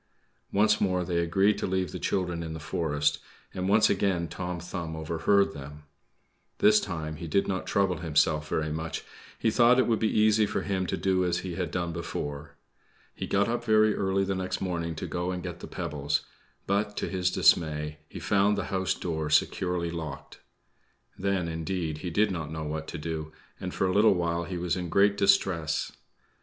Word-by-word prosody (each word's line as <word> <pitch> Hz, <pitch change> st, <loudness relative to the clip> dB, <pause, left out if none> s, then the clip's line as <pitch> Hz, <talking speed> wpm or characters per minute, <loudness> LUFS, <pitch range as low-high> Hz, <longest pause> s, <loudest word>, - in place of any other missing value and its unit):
Once 105 Hz, +1 st, +3 dB
more 90 Hz, -3 st, +1 dB
they 85 Hz, -1 st, 0 dB
agreed 95 Hz, +5 st, +2 dB
to -, -, -1 dB
leave 95 Hz, -1 st, -1 dB
the -, -, -5 dB
children 90 Hz, -3 st, -1 dB
in 80 Hz, -1 st, -5 dB
the 80 Hz, -, -6 dB
forest, 75 Hz, -2 st, 0 dB, 0.3 s
and 95 Hz, +1 st, -2 dB
once 105 Hz, +2 st, +5 dB
again 95 Hz, -4 st, +1 dB
Tom 90 Hz, 0 st, -4 dB
Thumb 85 Hz, -2 st, -5 dB
overheard 80 Hz, +5 st, +2 dB
them. 75 Hz, +1 st, -9 dB, 0.7 s
This 105 Hz, 0 st, +6 dB
time 80 Hz, -5 st, -4 dB
he 85 Hz, -, -6 dB
did 100 Hz, +5 st, +1 dB
not 95 Hz, -1 st, -2 dB
trouble 95 Hz, -3 st, +1 dB
himself 75 Hz, -1 st, +1 dB
very 80 Hz, -1 st, -1 dB
much; 80 Hz, +1 st, -4 dB, 0.3 s
he 110 Hz, -, +1 dB
thought 120 Hz, +2 st, +5 dB
it 130 Hz, -, +4 dB
would 115 Hz, -2 st, +1 dB
be 110 Hz, -, +2 dB
easy 110 Hz, 0 st, +4 dB
for -, -, -2 dB
him 95 Hz, -2 st, -1 dB
to -, -, -1 dB
do 95 Hz, -1 st, +1 dB
as 90 Hz, -1 st, 0 dB
he 90 Hz, -, -4 dB
had 90 Hz, -1 st, -2 dB
done 85 Hz, -1 st, -2 dB
before. 75 Hz, -3 st, -5 dB, 0.6 s
He -, -, -5 dB
got 100 Hz, +1 st, +2 dB
up 120 Hz, +1 st, -1 dB
very 110 Hz, -2 st, +4 dB
early 95 Hz, 0 st, +1 dB
the 95 Hz, 0 st, -1 dB
next 95 Hz, -1 st, -2 dB
morning 85 Hz, -3 st, -2 dB
to -, -, -5 dB
go 90 Hz, 0 st, -2 dB
and 90 Hz, -1 st, -3 dB
get 85 Hz, -1 st, -6 dB
the -, -, -8 dB
pebbles; 75 Hz, -5 st, -2 dB, 0.4 s
but, 100 Hz, +1 st, 0 dB
to -, -, -1 dB
his 90 Hz, -1 st, 0 dB
dismay, 75 Hz, -4 st, +2 dB
he -, -, -8 dB
found 100 Hz, +1 st, +2 dB
the 100 Hz, -, -1 dB
house 95 Hz, -1 st, +1 dB
door 80 Hz, -3 st, -3 dB
securely 85 Hz, +2 st, +1 dB
locked. 75 Hz, -5 st, -7 dB, 0.8 s
Then, 95 Hz, -2 st, -1 dB
indeed, 80 Hz, -1 st, -3 dB
he 90 Hz, -, -4 dB
did 105 Hz, +4 st, +2 dB
not 80 Hz, -5 st, -4 dB
know 80 Hz, 0 st, -4 dB
what 80 Hz, +1 st, -4 dB
to -, -, -5 dB
do, 80 Hz, 0 st, -4 dB, 0.3 s
and -, -, -4 dB
for -, -, 0 dB
a 90 Hz, -, +1 dB
little 105 Hz, 0 st, +5 dB
while 85 Hz, -1 st, -1 dB
he 90 Hz, 0 st, -4 dB
was 85 Hz, 0 st, -1 dB
in 90 Hz, -2 st, -4 dB
great 100 Hz, +2 st, +4 dB
distress. 95 Hz, -5 st, +2 dB
90 Hz, 195 wpm, -28 LUFS, 80-100 Hz, 0.8 s, This